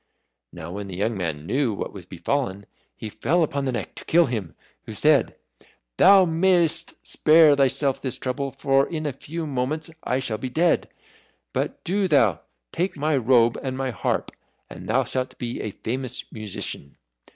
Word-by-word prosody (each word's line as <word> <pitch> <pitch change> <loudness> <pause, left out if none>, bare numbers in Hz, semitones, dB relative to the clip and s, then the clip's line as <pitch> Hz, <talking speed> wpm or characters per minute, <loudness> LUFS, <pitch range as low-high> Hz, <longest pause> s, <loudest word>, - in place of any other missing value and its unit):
Now 85 -1 -8
when 100 +1 -6
the 95 - -7
young 110 +5 -1
man 80 -5 -3
knew 130 - 0
what - - -5
was 95 -3 -10
befallen, 100 +1 -2 0.3
he 110 - -6
fell 130 +12 +1
upon 140 -2 -2
the 130 - 0
Neck 120 - -4
to - - -10
kill 170 +1 +4
him, 110 - -4 0.3
who 110 - -6
said, 145 +2 +3 0.6
"Thou 195 -1 +7
mayest 170 -1 +2
spare 155 -1 +5
thyself 135 0 +1
this 130 - -2
trouble, 135 +2 -3
for 135 +1 +1
in 155 -2 -4
a 145 - -1
few 160 +5 -6
moments 150 +4 -3
I 130 - 0
shall 115 -5 -3
be 130 - -4
dead. 165 +6 +1 0.6
But - - -3
do 195 +2 0
thou 115 - +3 0.3
take 180 -1 -2
my 150 +1 +1
robe 120 -2 +3
and 130 -1 -4
my 135 -1 -2
harp, 105 - -2 0.4
and - - -9
thou - - +3
shalt 130 -1 -3
be 120 -1 -4
a 110 - -3
famous 125 +5 -4
musician." 105 -9 -6
130 Hz, 175 wpm, -24 LUFS, 110-155 Hz, 0.6 s, Thou